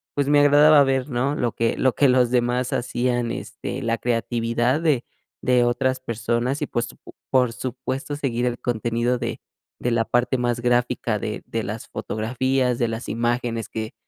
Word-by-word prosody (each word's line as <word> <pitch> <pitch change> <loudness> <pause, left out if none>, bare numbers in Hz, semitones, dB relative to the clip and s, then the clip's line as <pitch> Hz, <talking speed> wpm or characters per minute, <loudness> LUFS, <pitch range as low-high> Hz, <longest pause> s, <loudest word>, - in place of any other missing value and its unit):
pues 145 -1 +1
me 145 0 +5
agradaba 145 +1 +7
ver, 135 +1 0
¿no? 130 +3 0
Lo 120 -5 0
que 115 0 0
lo 130 -2 +2
que 145 - +4
los 125 -1 +3
demás 125 0 +1
hacían, 120 -1 -1
este, - - -5
la 115 0 0
creatividad 120 +3 0
de 150 -7 +1 0.4
de 125 -1 +3
otras 130 +2 +1
personas 120 +3 -2
y, - - -2
pues 120 0 -2 0.2
po - - -14 0.2
por 125 -3 +3
supuesto 130 +3 -4
seguir 125 -4 -1
el 120 0 -2
contenido 120 +1 0
de 120 -1 -4 0.4
de 125 - -1
la 115 -1 +2
parte 120 +3 +1
más 120 0 -1
gráfica 120 0 +1
de - - -4
de - - -2
las - - -5
fotografías, 125 +3 -1
de 120 - +2
las 115 +2 -5
imágenes 120 0 -1
que 110 0 -5
120 Hz, 175 wpm, -23 LUFS, 120-130 Hz, 0.4 s, agradaba